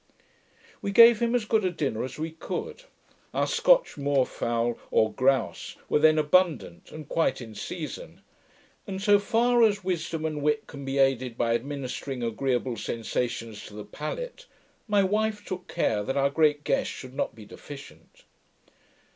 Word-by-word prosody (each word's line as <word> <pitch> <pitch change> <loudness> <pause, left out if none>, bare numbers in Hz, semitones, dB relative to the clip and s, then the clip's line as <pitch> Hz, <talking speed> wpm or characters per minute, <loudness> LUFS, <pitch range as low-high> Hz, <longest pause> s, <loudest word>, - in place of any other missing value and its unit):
We - - -2
gave 230 +2 +8
him 235 +1 +1
as 235 -3 0
good 215 -1 +2
a 185 - +2
dinner 145 -10 -2
as 130 - -6
we 160 +1 -3
could. 455 - -6 0.5
Our - - +2
Scotch - - +3
muir 140 -2 +2
fowl, 120 0 -2
or 110 -1 +2
growse, 130 -3 0
were - - +3
then 155 +1 +5
abundant, 155 - +1
and 155 -2 -9
quite 165 - +1
in 115 -3 -9
season; 180 - -7 0.7
and, 190 -1 -4
so 205 0 +5
far 240 +3 +2
as 205 -3 +3
wisdom 170 -3 -2
and 155 -2 -2
wit 150 0 +1
can 140 -2 -9
be 135 +1 -2
aided 130 -3 +2
by 115 -1 +1
administering 135 0 -4
agreeable 125 +1 -1
sensations 115 0 -3
to 105 - -12
the 105 - -7
palate, - - -6 0.4
my 205 -2 +3
wife 210 +2 0
took 185 -1 -6
care 105 -2 0
that 135 +7 -2
our 140 0 +2
great 150 -1 +2
guest - - 0
should 130 -1 -9
not 140 - -2
be 110 -2 -12
deficient. 105 - -12
150 Hz, 165 wpm, -27 LUFS, 125-200 Hz, 0.7 s, gave